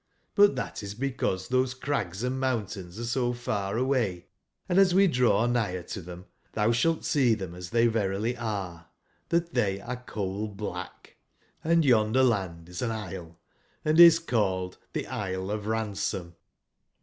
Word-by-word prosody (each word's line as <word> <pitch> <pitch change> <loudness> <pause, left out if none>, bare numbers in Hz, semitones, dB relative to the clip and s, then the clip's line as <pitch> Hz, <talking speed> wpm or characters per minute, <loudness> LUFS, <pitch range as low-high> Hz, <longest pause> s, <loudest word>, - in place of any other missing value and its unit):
But 205 -1 +5
tbat - - -4
is 100 0 -6
because 120 -7 -2
tbose 130 0 +1
crags 120 -8 -2
and 130 +1 -1
mountains 105 -8 -3
are 120 - -4
so 120 +1 0
far 105 -4 -2
away, 120 -9 0 0.4
and 180 +1 +3
as 185 -2 +5
we 195 +1 +6
draw 125 - +3
nigber 110 -7 0
to 100 - -4
tbem, 90 +1 -10 0.3
tbou 110 +2 +2
sbalt 165 +7 +1
see 125 -6 +3
tbem 95 -5 -6
as 90 0 -7
tbey 115 0 +3
verily 110 +1 0
are, 100 -8 -4 0.4
tbat 170 0 +1
tbey 100 -7 -1
are 125 - -3
coal/blach; 105 +1 -5 0.5
and 165 0 +3
yonder 120 0 +4
land 95 -9 0
is 90 0 -7
an 120 - 0
isle, 95 -6 -6 0.5
and 155 +2 +3
is 170 -1 +10
called 95 - -1 0.2
tbe - - -1
Isle 95 0 -3
of 105 0 -3
Ransom. 100 -5 -2
110 Hz, 155 wpm, -28 LUFS, 95-130 Hz, 0.5 s, is